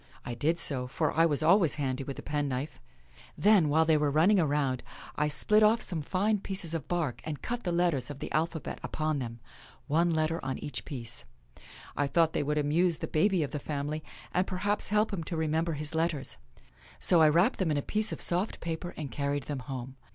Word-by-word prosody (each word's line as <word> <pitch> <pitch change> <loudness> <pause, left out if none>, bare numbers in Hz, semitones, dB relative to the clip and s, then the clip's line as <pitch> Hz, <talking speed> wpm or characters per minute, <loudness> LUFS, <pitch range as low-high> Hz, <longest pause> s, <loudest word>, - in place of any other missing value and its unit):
I 120 - -4
did 155 +8 0
so, 130 -6 +1
for 150 +4 -1
I 165 +1 +5
was 150 -1 -1
always 170 0 +5
handy 135 -2 -2
with 135 0 -6
a - - -8
penknife. 145 -1 -3 0.6
Then, 200 -7 +5
while 160 +2 +4
they 160 -1 +4
were 150 -1 +1
running 170 +8 +4
around, 145 -5 +1 0.3
I 150 - +1
split 210 +8 +3
off 215 +2 +5
some 170 -5 -2
fine 200 +7 0
pieces 190 -4 -1
of 155 -4 -4
bark 170 -8 -2
and 155 -2 -6
cut 240 0 -4
the 175 - 0
letters 170 -7 +1
of 145 - -6
the - - -6
alphabet 160 0 -2
upon 155 -2 -2
them 115 -2 -6 0.2
— 130 - -24
one 165 +4 +2
letter 160 +1 0
on 130 -1 -3
each 145 - -6
piece. 120 -5 -5 0.7
I 145 - +1
thought 165 +1 +2
they - - 0
would 150 +1 -1
amuse 160 +3 +2
the - - -4
baby 185 +1 +2
of 145 - -4
the 150 - -3
family, 150 +2 -4 0.3
and 185 +1 +1
perhaps 200 +3 -1
help 210 +1 +1
him 170 -4 -3
to 170 - -3
remember 160 +1 0
his 150 +1 -4
letters. 160 -4 -1 0.6
So 170 -2 +4
I 155 - +7
wrapped 175 - +3
them 185 -4 +1
in 150 - +1
a 140 - -1
piece 215 +1 +4
of - - -5
soft 180 +5 0
paper 170 +1 -5
and 145 -5 -5
carried 140 +2 -2
them 145 -1 -4
home. 130 0 -7
155 Hz, 215 wpm, -29 LUFS, 145-175 Hz, 0.7 s, I